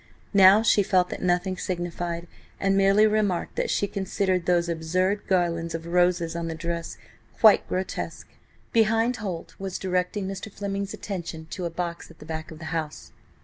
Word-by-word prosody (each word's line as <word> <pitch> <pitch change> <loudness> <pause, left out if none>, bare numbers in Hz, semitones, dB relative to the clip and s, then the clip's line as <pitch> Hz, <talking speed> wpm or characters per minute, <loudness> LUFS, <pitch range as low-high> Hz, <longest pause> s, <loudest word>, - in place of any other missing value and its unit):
Now 200 +2 +7
she 215 - +4
felt 185 -2 +2
that - - -6
nothing 180 +1 +1
signified, 175 -1 -3 0.3
and 195 0 +2
merely 195 +2 +5
remarked 210 -4 0
that - - 0
she 200 - +1
considered 190 -2 -1
those 175 -1 +3
absurd 180 +5 -1
garlands 170 -3 0
of 165 0 -6
roses 175 -1 +2
on 170 0 -3
the 165 - -4
dress 170 0 -4 0.4
quite 220 -2 +6
grotesque. 185 +1 -4 0.4
Behind, 225 +2 +3
Holt 190 -7 -5
was 190 -1 -4
directing 185 +1 -1
Mr. 195 +2 -6
Fleming's 200 0 -4
attention 170 -5 -6
to 185 - -4
a - - -1
box 170 0 -5
at - - -16
the - - -12
back 160 0 -5
of 160 - -10
the 160 - -9
house. 155 -2 -4
180 Hz, 170 wpm, -26 LUFS, 170-195 Hz, 0.4 s, Now